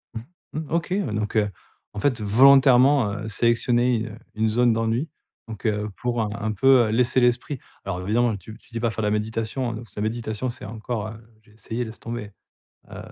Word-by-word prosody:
Mmh 110 - -4 0.3
Mmh, 155 +1 -3
OK, 170 +1 0
heu, 185 - -1
donc, 105 +1 -2
heu, 105 -1 +2 0.4
en 105 - -5
fait, 125 -1 +1
volontairement, 130 +1 +6
heu, 110 +2 -5
sélectionner, 120 +1 +2
heu, 105 - -9 0.2
une 110 0 +1
zone 120 +1 +3
d'ennui. 115 +7 -1 0.4
Donc, 110 -1 -9
heu, 105 -1 0
pour 120 -2 0
un 105 - -1
un 110 +1 -1
peu 125 0 +5
laisser 125 +3 +2
l'esprit 125 +2 +1 0.2
alors 95 -2 -3
évidemment 110 +2 +1
tu 110 +4 -11
tu - - -24
dis 115 - -4
pas 115 -1 0
faire 110 - -4
de 105 - +1
la - - +1
méditation, 110 +4 -2
hein, - - -4
donc 115 0 -8
ça 105 - -9
méditation 110 +2 -2
c'est 120 - -9
encore 110 +1 -4
heu 110 +1 -9 0.2
j'ai 110 0 -24
essayé, 115 +2 -4
laisse 110 -1 -9
tomber! 115 -3 -6 0.6
Heu - - -8
115 Hz, 205 wpm, -24 LUFS, 110-125 Hz, 0.6 s, volontairement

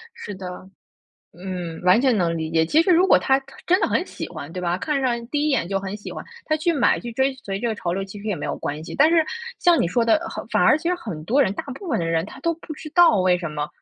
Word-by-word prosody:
是 205 - -7
的， 185 -1 -7 0.9
嗯， 175 -2 -6
完 185 +5 +5
全 255 -3 +3
能 170 -4 +1
理 160 -1 -3
解。 160 0 +3
其 315 - +4
实 370 - +1
如 355 +2 +5
果 - - +6
他 265 0 +2
他 270 - -17
真 365 +3 +3
的 - - +2
很 - - +1
喜 - - -7
欢， 145 +3 -8
对 180 - -5
吧， 175 0 0
看 295 +2 -1
上 235 -3 -1
第 295 +1 0
一 - - +2
眼 175 -11 0
就 195 0 0
很 195 +1 -5
喜 205 - -8
欢， - - -7 0.2
他 310 - +1
去 325 +2 +1
买、 280 -7 +2
去 240 0 -7
追 265 +3 +1
随 195 -1 -3
这 240 - -1
个 225 - -1
潮 175 -4 -3
流， 195 +1 -2
其 195 +1 -10
实 210 - -9
也 200 - -1
没 - - -5
有 - - -3
关 150 +2 -4
系。 160 - -8
但 310 +3 +5
是 330 -2 +4 0.3
像 345 -2 +4
你 - - +2
说 230 +6 +1
的， 230 - +4
呃， 335 +2 -6
反 - - +2
而 - - +6
其 335 - -3
实 360 - +2
很 185 - -7
多 250 - +2
人 195 - 0
大 - - -4
部 380 +6 -9
分 245 - +1
的 170 - -1
人 165 0 0
他 - - -12
都 335 - +1
不 325 0 -10
知 310 +1 -9
道 345 - +6
为 185 -1 +3
什 170 -3 -5
么， 150 -1 -3
220 Hz, 320 characters per minute, -23 LUFS, -, 0.9 s, 果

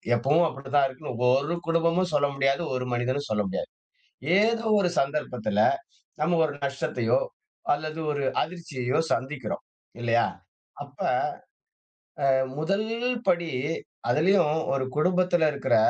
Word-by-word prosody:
எப்பவும் 145 +8 +3
அப்படிதான் 135 +1 +1
இருக்குன்னு 130 0 -7
ஒவ்வொரு 140 +6 +2
குடும்பமும் 165 +2 +2
சொல்ல 145 -1 +3
முடியாது. 135 +4 +1
ஒரு 125 0 -2
மனிதனும் 130 +4 -1
சொல்ல 105 -1 +2
முடியாது. - - -3 0.7
ஏதோ 225 +2 +2 0.2
ஒரு 180 - +2
சந்தர்ப்பத்துல, 125 -7 -1 0.6
நம்ம 170 +3 +2
ஒரு 150 - -1
நஷ்டத்தையோ! 140 - 0 0.5
அல்லது 155 +2 -2
ஒரு 145 -1 -2 0.2
அதிர்ச்சியையோ! 150 -7 -3
சந்திக்கிறோம். 130 -4 -3 0.4
இல்லையா? 120 0 +3 0.6
அப்ப, - - -19 1.3
அ - - +5 0.3
முதல் 195 +7 0 0.4
படி 170 -2 +2 0.6
அதிலயும் 165 +2 +4 0.2
ஒரு 135 -1 0
குடும்பத்துல 180 0 +3
இருக்கிற 140 - +1
145 Hz, 115 wpm, -26 LUFS, 130-170 Hz, 1.3 s, அ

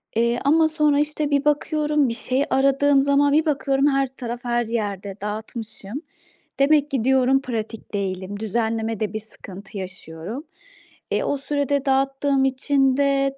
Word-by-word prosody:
eee, 235 +1 +2
ama 315 +2 +5
sonra, 300 -2 +2
işte, 295 0 -1
bir 280 0 +2
bakıyorum, 300 -2 +1
bir 230 - -3
şey 265 +4 -1
aradığım 275 +1 +3
zaman 280 +1 +3
bir 310 +2 +3
bakıyorum 275 -2 +1
her 275 -1 +2
taraf 245 -2 -7
her 240 0 +1
yerde 205 -4 -3
dağıtmışım. 220 +3 -6 0.6
Demek 295 +1 +3
ki 260 -5 0
diyorum 265 +1 +3
pratik 225 -4 -5
değilim. 195 0 -3
Düzenlemede 220 -1 -1
bir 215 - -2
sıkıntı 200 -2 -11
yaşıyorum. 185 - -7 0.7
Eee, - - +1
o 285 - 0
sürede 285 0 -1
dağıttığım 270 0 +2
için 270 0 +2
de 275 -1 +1
265 Hz, 145 wpm, -23 LUFS, 220-285 Hz, 0.7 s, ama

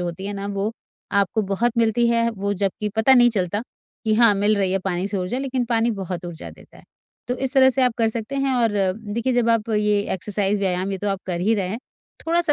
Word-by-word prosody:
जो - - -2
होती 175 +2 -5
है 205 - -3
ना 200 0 -5
वो 200 +1 -2 0.4
आपको 200 +2 +2
बहुत 235 +4 +1
मिलती 230 +1 +3
है, 230 0 +2
वो 200 -1 -3
जबकि 200 +2 -2
पता 220 +4 +5
नहीं 240 -1 +6
चलता 205 0 -1 0.4
कि 220 -1 +2
हाँ, 225 -2 +5
मिल 205 +2 +2
रही 190 -1 +1
है 195 - +1
पानी 185 0 -1
से 205 - -3
ऊर्जा, 185 +7 -2
लेकिन 265 -2 -1
पानी 230 0 +1
बहुत 185 -4 -5
ऊर्जा 170 -2 -8
देता - - -17
है। - - -18 0.4
तो 250 - 0
इस 265 0 -1
तरह 265 -1 +6
से 260 0 +1
आप 250 -2 +2
कर 225 -1 +3
सकते 230 +4 -5
हैं 275 -1 +1
और 235 -3 +2 0.4
देखिए 235 +3 0
जब 240 -1 +2
आप 230 -1 +1
ये 210 -1 +2
एक्सरसाइज 200 +2 -1
व्यायाम 190 0 -1
ये 195 - -3
तो 205 - -2
आप 195 -1 -2
कर 175 -2 -2
ही 215 +5 +2
रहे 195 -4 -1
हैं, 220 - -4 0.5
थोड़ा-सा 335 -1 +2
210 Hz, 245 wpm, -22 LUFS, 195-235 Hz, 0.5 s, नहीं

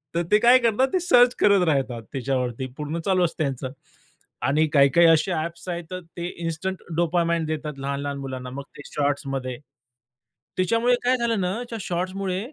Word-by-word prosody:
तर 170 - +1
ते 210 - +7
काय 240 +2 +7
करतात? 235 +2 +2
ते 370 - +3
सर्च 245 -7 +5
करत 200 -3 +5
राहतात 135 -6 0
त्याच्यावरती, 130 -1 -2
पूर्ण 150 +3 -3
चालू 185 -2 +3
असतं 160 -1 -2
त्यांचं. 130 -2 -3 0.8
आणि 155 +3 +3
काही-काही 150 +4 +6
असे 165 +3 +4
ॲप्स 170 +2 -4
आहेत 175 -1 -3
तर 185 - -4 0.2
ते 170 0 -3 0.2
इन्स्टंट 170 +3 -3
डोपामाइन 170 0 +1
देतात 155 -1 -3
लहान-लहान 140 +1 -3
मुलांना. 130 -2 -6
मग 140 +2 -6
ते - - -8
शॉर्ट्समध्ये. 135 -3 -2 1.0
त्याच्यामुळे 230 +7 +3
काय 255 +1 +3
झालं 230 -3 0
ना 180 +1 0 0.2
त्या 230 - -5
शॉट्समुळे 185 +1 -2
165 Hz, 165 wpm, -24 LUFS, 140-190 Hz, 1.0 s, ते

